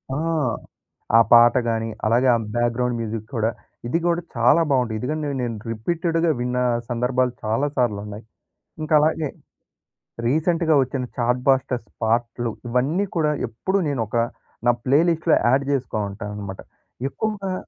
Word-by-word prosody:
ఆ! -, -, -1 dB, 1.0 s
ఆ -, -, +8 dB
పాట 120 Hz, 0 st, +8 dB
గాని, 115 Hz, 0 st, -1 dB, 0.2 s
అలాగే 120 Hz, +4 st, +3 dB
ఆ -, -, +4 dB, 0.2 s
బ్యాక్‌గ్రౌండ్ 120 Hz, +1 st, 0 dB
మ్యూజిక్ 110 Hz, -1 st, -4 dB
కూడా, 110 Hz, 0 st, +1 dB, 0.4 s
ఇది 165 Hz, +7 st, +1 dB
కూడా 170 Hz, 0 st, +1 dB
చాలా 125 Hz, +8 st, +4 dB
బాగుంటాయి. 125 Hz, -5 st, +1 dB
ఎదుకంటే 150 Hz, +4 st, -2 dB
నేను 120 Hz, -2 st, -2 dB, 0.2 s
రిపీటేట్‌గా 165 Hz, +7 st, 0 dB
విన్న 125 Hz, 0 st, -1 dB, 0.3 s
సందర్భాలు 125 Hz, +1 st, 0 dB
చాలా 115 Hz, +7 st, 0 dB
సార్లున్నాయి. 105 Hz, -3 st, -1 dB, 0.6 s
ఇంకా 155 Hz, 0 st, -2 dB
అలాగే 155 Hz, -1 st, +1 dB, 1.0 s
రీసెంట్‌గా 160 Hz, +3 st, +2 dB
వచ్చిన 130 Hz, 0 st, -2 dB
చాట్ 125 Hz, +1 st, +1 dB
బాస్టర్స్ 130 Hz, -4 st, +1 dB, 0.2 s
పాట‌లు 115 Hz, +1 st, 0 dB, 0.2 s
ఇవన్నీ 140 Hz, +11 st, +1 dB
కూడా 150 Hz, -2 st, +2 dB, 0.2 s
ఎప్పుడూ 190 Hz, -, -1 dB
నేను 140 Hz, -5 st, -1 dB
ఒక 115 Hz, -, -2 dB, 0.5 s
నా 120 Hz, -, +6 dB
ప్లే‌లిస్ట్‌లో 160 Hz, +3 st, +3 dB
యాడ్ 135 Hz, +3 st, +3 dB
చేసుకో 135 Hz, -5 st, -1 dB
ఉంటాననమాట. 100 Hz, -1 st, -7 dB, 0.5 s
ఎక్కువగా 195 Hz, +2 st, -3 dB
125 Hz, 130 wpm, -22 LUFS, 115-155 Hz, 1.0 s, ఆ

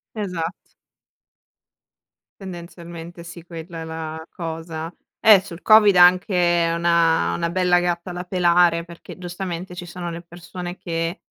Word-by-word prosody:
Esatt 180 Hz, -5 st, -5 dB, 1.7 s
Tendenzialmente 170 Hz, -2 st, -9 dB
sì 170 Hz, 0 st, -10 dB
quella 165 Hz, 0 st, -8 dB
è -, -, -5 dB
la 160 Hz, 0 st, -6 dB
cosa. 165 Hz, -1 st, -6 dB, 0.3 s
Eh 210 Hz, -4 st, +7 dB
sul 180 Hz, -2 st, -10 dB
covid 215 Hz, -2 st, +7 dB
anche 175 Hz, -2 st, +4 dB
una 170 Hz, -, +2 dB
una 170 Hz, -, -1 dB
bella 180 Hz, 0 st, +2 dB
gatta 175 Hz, +1 st, -2 dB
da 180 Hz, +1 st, -5 dB
pelare 175 Hz, -2 st, +3 dB
perché 170 Hz, -1 st, -12 dB
giustamente 180 Hz, 0 st, -6 dB
ci 180 Hz, 0 st, -7 dB
sono 175 Hz, 0 st, -6 dB
le 170 Hz, 0 st, -6 dB
persone 175 Hz, +1 st, -8 dB
che, 165 Hz, +2 st, -3 dB
175 Hz, 125 wpm, -22 LUFS, 165-180 Hz, 1.7 s, Eh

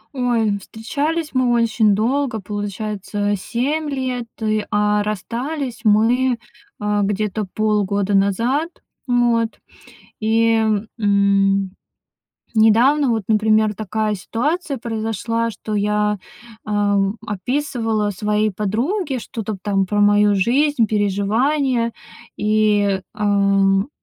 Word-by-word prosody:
Ой, 230 Hz, -5 st, +1 dB
встречались 295 Hz, -, -3 dB
мы 255 Hz, -2 st, +2 dB
очень 225 Hz, -3 st, +3 dB
долго, 245 Hz, +1 st, 0 dB
получается, 205 Hz, 0 st, -3 dB
7 285 Hz, +10 st, -2 dB
лет. 255 Hz, -3 st, -3 dB
И, 215 Hz, -1 st, 0 dB
а 210 Hz, 0 st, +2 dB
расстались 235 Hz, -, -4 dB
мы, 235 Hz, +4 st, +3 dB, 0.4 s
а, 210 Hz, 0 st, 0 dB
где-то 205 Hz, 0 st, -1 dB
полгода 205 Hz, -2 st, 0 dB
назад 230 Hz, -, +1 dB, 0.4 s
вот 240 Hz, -2 st, +1 dB, 0.6 s
и, 225 Hz, +1 st, +2 dB, 0.4 s
м, 200 Hz, -2 st, +2 dB, 0.9 s
недавно 245 Hz, +6 st, +4 dB
вот, 220 Hz, -3 st, 0 dB
например, 215 Hz, -1 st, +2 dB
такая 215 Hz, 0 st, -2 dB
ситуация 285 Hz, -, -2 dB
произошла, 230 Hz, 0 st, -2 dB
что 215 Hz, 0 st, -7 dB
я, 210 Hz, 0 st, +1 dB, 0.5 s
ам, 205 Hz, -1 st, +1 dB
описывала 225 Hz, 0 st, -1 dB
своей 210 Hz, +1 st, 0 dB
подруге 255 Hz, -, -1 dB
что-то 220 Hz, -2 st, -5 dB
там 195 Hz, -2 st, 0 dB
про 205 Hz, +2 st, -1 dB
мою 205 Hz, 0 st, +4 dB
жизнь, 245 Hz, +4 st, +2 dB
переживания. 230 Hz, +5 st, +1 dB, 0.4 s
И, 210 Hz, -2 st, +2 dB
ам 200 Hz, +1 st, +2 dB
215 Hz, 95 wpm, -20 LUFS, 205-240 Hz, 0.9 s, недавно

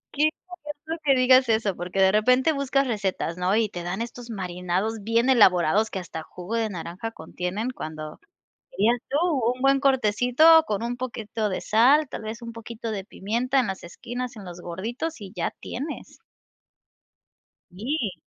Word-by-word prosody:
Qué 300 Hz, +2 st, +4 dB, 0.4 s
gracioso 310 Hz, +2 st, -6 dB
que 275 Hz, -2 st, +5 dB
digas 255 Hz, 0 st, +5 dB
eso, 220 Hz, -3 st, +1 dB
porque 180 Hz, +2 st, -2 dB
de 190 Hz, 0 st, +6 dB
repente 250 Hz, +8 st, +4 dB
buscas 275 Hz, -1 st, +1 dB
recetas, 195 Hz, -7 st, -2 dB
¿no? 180 Hz, +2 st, +1 dB
Y 220 Hz, -1 st, +2 dB
te 175 Hz, -3 st, -6 dB
dan 180 Hz, +5 st, -3 dB
estos 240 Hz, +1 st, -7 dB
marinados 185 Hz, +1 st, -2 dB
bien 230 Hz, +4 st, +2 dB
elaborados 205 Hz, -3 st, +5 dB
que 190 Hz, -, -4 dB
hasta 165 Hz, -2 st, -7 dB
jugo 180 Hz, +7 st, -6 dB
de 225 Hz, -1 st, 0 dB
naranja 180 Hz, +4 st, -6 dB
contienen, 180 Hz, +5 st, -4 dB
cuando, 155 Hz, -10 st, -7 dB, 0.5 s
dirías 240 Hz, -, +2 dB
tú, 280 Hz, -, +1 dB, 0.4 s
un 255 Hz, -, -12 dB
buen 275 Hz, 0 st, +4 dB
cortecito 265 Hz, +4 st, +5 dB
con 210 Hz, +1 st, -1 dB
un 240 Hz, +1 st, -3 dB
poquito 225 Hz, -4 st, -3 dB
de 185 Hz, -, -3 dB
sal, 270 Hz, +8 st, +4 dB
tal -, -, -6 dB
vez 220 Hz, +2 st, -6 dB
un 230 Hz, 0 st, -7 dB
poquito 230 Hz, 0 st, -6 dB
de 195 Hz, -2 st, -4 dB
pimienta 240 Hz, +8 st, -1 dB
en 250 Hz, -, +2 dB
las 190 Hz, 0 st, -5 dB
esquinas, 245 Hz, +7 st, -6 dB
en 200 Hz, -3 st, -10 dB
los 175 Hz, 0 st, -9 dB
gorditos 225 Hz, -, -4 dB
y 195 Hz, -3 st, -9 dB
ya 170 Hz, -, -1 dB
tienes. 285 Hz, +6 st, -6 dB, 1.5 s
Sí. 220 Hz, -, -2 dB
225 Hz, 170 wpm, -25 LUFS, 190-255 Hz, 1.5 s, de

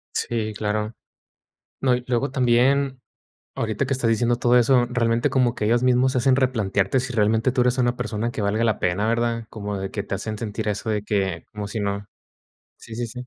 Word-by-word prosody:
Sí, 110 Hz, -2 st, -1 dB
claro. 105 Hz, +1 st, -2 dB, 0.9 s
No, 130 Hz, -2 st, +3 dB
y 125 Hz, 0 st, -3 dB
luego 130 Hz, +3 st, 0 dB
también 130 Hz, +1 st, +2 dB, 0.5 s
ahorita 110 Hz, +4 st, -1 dB
que 130 Hz, -, -2 dB
estás 125 Hz, -3 st, 0 dB
diciendo 120 Hz, +1 st, +2 dB
todo 120 Hz, +1 st, +4 dB
eso, 125 Hz, +1 st, +4 dB
realmente 115 Hz, -1 st, +1 dB
como 125 Hz, -3 st, +2 dB
que 105 Hz, -, -3 dB
ellos 120 Hz, +3 st, +2 dB
mismos 125 Hz, +1 st, +3 dB
hacen 130 Hz, +1 st, +3 dB
replantearte 110 Hz, -3 st, +1 dB
si 130 Hz, 0 st, -5 dB
realmente 110 Hz, +3 st, +2 dB
tú 125 Hz, -1 st, +2 dB
eres 125 Hz, +1 st, +1 dB
una 120 Hz, -1 st, +1 dB
persona 115 Hz, +1 st, -2 dB
que 115 Hz, -, -4 dB
valga 105 Hz, +3 st, +1 dB
la 110 Hz, -2 st, +1 dB
pena, 95 Hz, +5 st, 0 dB
¿verdad? 115 Hz, 0 st, 0 dB
Como 105 Hz, -2 st, -5 dB
de 95 Hz, 0 st, -4 dB
que 100 Hz, -, -3 dB
te -, -, -4 dB
hacen 110 Hz, +3 st, -4 dB
sentir 105 Hz, -1 st, -4 dB
eso 105 Hz, +2 st, -2 dB
de 105 Hz, -1 st, -1 dB
que 95 Hz, -6 st, -1 dB
como 105 Hz, -1 st, -5 dB
si 110 Hz, +2 st, -4 dB
no 100 Hz, 0 st, -2 dB, 0.7 s
Sí, 115 Hz, -, -11 dB
sí, 120 Hz, 0 st, -2 dB
sí. 125 Hz, +2 st, -8 dB
115 Hz, 205 wpm, -23 LUFS, 105-125 Hz, 0.9 s, todo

